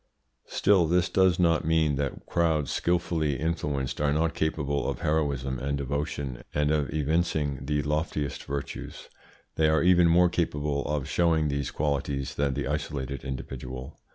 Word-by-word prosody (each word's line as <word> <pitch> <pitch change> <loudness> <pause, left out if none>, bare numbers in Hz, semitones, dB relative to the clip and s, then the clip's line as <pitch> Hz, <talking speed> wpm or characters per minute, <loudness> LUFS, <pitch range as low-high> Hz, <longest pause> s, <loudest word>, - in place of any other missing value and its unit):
Still 95 -4 +3
this 90 +1 +2
does 95 -2 +3
not 85 -3 +3
mean 80 -2 +2
that 70 -1 -3
crowds, 80 -4 +1
skilfully 85 -4 0
influenced, 75 -5 -2
are 75 -1 +2
not 80 +2 +1
capable 75 -3 -1
of - - -4
heroism 70 -4 0
and 70 +2 -1
devotion 70 -2 -3
and 75 0 +2
of 75 -2 0
evincing 75 -1 0
the 75 -1 0
loftiest 75 -1 -2
virtues; 70 0 -6 0.5
they 80 -1 +4
are 80 -1 +3
even 90 -1 +5
more 90 +2 +5
capable 75 -4 -1
of 75 -3 -2
showing 80 -3 +2
these 70 0 -1
qualities 70 -2 -2
than 70 -2 0
the - - -2
isolated 70 -2 -3
individual. 65 0 -6
75 Hz, 150 wpm, -27 LUFS, 70-80 Hz, 0.5 s, even